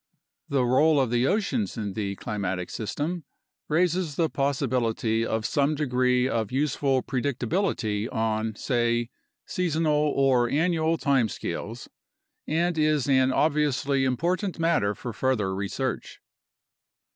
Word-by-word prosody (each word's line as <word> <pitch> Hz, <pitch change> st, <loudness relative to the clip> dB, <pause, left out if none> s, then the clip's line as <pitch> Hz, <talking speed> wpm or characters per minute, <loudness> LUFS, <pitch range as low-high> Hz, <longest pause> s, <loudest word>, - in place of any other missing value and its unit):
The 135 Hz, -3 st, +2 dB
role 145 Hz, +5 st, +4 dB
of 130 Hz, -4 st, +1 dB
the 120 Hz, +2 st, +2 dB
oceans 210 Hz, -, 0 dB
in 105 Hz, -3 st, -3 dB
the 100 Hz, -2 st, -3 dB
climatic 95 Hz, -3 st, -3 dB
system 150 Hz, -, -3 dB, 0.5 s
raises 170 Hz, -1 st, +1 dB
the 165 Hz, 0 st, +1 dB
pos 140 Hz, 0 st, 0 dB
sibility 115 Hz, -3 st, 0 dB
of 110 Hz, -1 st, -2 dB
some 145 Hz, +5 st, +1 dB
degree 125 Hz, -3 st, +1 dB
of 115 Hz, -5 st, -1 dB
useful 135 Hz, -1 st, +1 dB
predictability 125 Hz, -, -1 dB
on, 110 Hz, -1 st, -1 dB
say, 120 Hz, 0 st, 0 dB, 0.3 s
seasonal 165 Hz, -3 st, 0 dB, 0.2 s
or 130 Hz, -3 st, +3 dB
annual 165 Hz, +3 st, +1 dB
time 135 Hz, -7 st, +2 dB
scales -, -, -5 dB, 0.6 s
and 170 Hz, +1 st, 0 dB
is 150 Hz, -3 st, +2 dB
an 130 Hz, -1 st, +4 dB
obviously 145 Hz, -2 st, +1 dB
important 175 Hz, -, 0 dB
matter 165 Hz, -12 st, +1 dB
for 120 Hz, +3 st, -6 dB
further 110 Hz, -8 st, 0 dB
research. 100 Hz, +7 st, -3 dB
130 Hz, 120 wpm, -26 LUFS, 115-155 Hz, 0.6 s, role